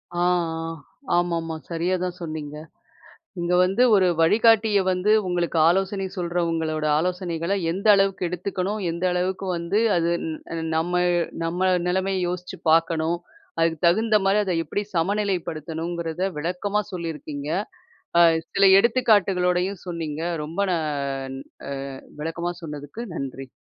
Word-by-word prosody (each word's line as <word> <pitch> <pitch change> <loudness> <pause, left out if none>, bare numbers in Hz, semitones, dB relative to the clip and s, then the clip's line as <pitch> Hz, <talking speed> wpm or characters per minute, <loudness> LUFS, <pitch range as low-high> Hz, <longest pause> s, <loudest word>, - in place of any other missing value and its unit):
ஆ - - -4
ஆ. - - +3 0.9
ஆமா-ஆமா. 165 -2 0
சரியா 175 +2 0
தான் 180 0 -3
சொன்னீங்க. 155 -2 -5 0.9
இங்க 175 +1 0
வந்து, 195 +7 +2
ஒரு 190 -2 +5
வழிகாட்டிய 220 +3 +4
வந்து 185 +3 +1 0.2
உங்களுக்கு 175 -2 0
ஆலோசனை 195 +2 +1
சொல்றவங்களோட 165 -3 -1
ஆலோசனைகள, 175 0 -2 0.2
எந்த 195 +5 -4
அளவுக்கு 195 -2 +1
எடுத்துக்கணும்? 190 +3 -3
எந்த 170 +2 -4
அளவுக்கு 185 +2 -1
வந்து 170 +6 0 0.2
அது 170 0 +1 0.4
ந் 165 - -3
நம்ம 175 +2 0 0.5
நம்ம 170 +2 -2 0.3
நிலைமைய 190 +1 0
யோசிச்சு 180 -1 -5
பார்க்கணும். 165 +1 +2 0.4
அதுக்கு 165 -1 +2
தகுந்தமாரி 210 +1 +3
அத 185 -3 -1
எப்பிடி 205 +7 -2
சமநிலைப்படுத்தணுங்கிறத, 170 -3 -2 0.2
விளக்கமா 185 +6 -1
சொல்லியிருக்கீங்க! 150 -4 -5 0.7
ஆ, - - +7 0.3
சில 195 - +4
எடுத்துக்காட்டுகளோடையும் 195 -6 +2
சொன்னீங்க. 160 -3 -4 0.2
ரொம்ப 165 +5 -6
நான் 140 -4 -2 0.3
ஆ - - -4 0.5
விளக்கமா 170 +2 -3
சொன்னதுக்கு 150 +7 -7
நன்றி! 135 -1 -5
175 Hz, 115 wpm, -24 LUFS, 165-190 Hz, 0.9 s, ஆ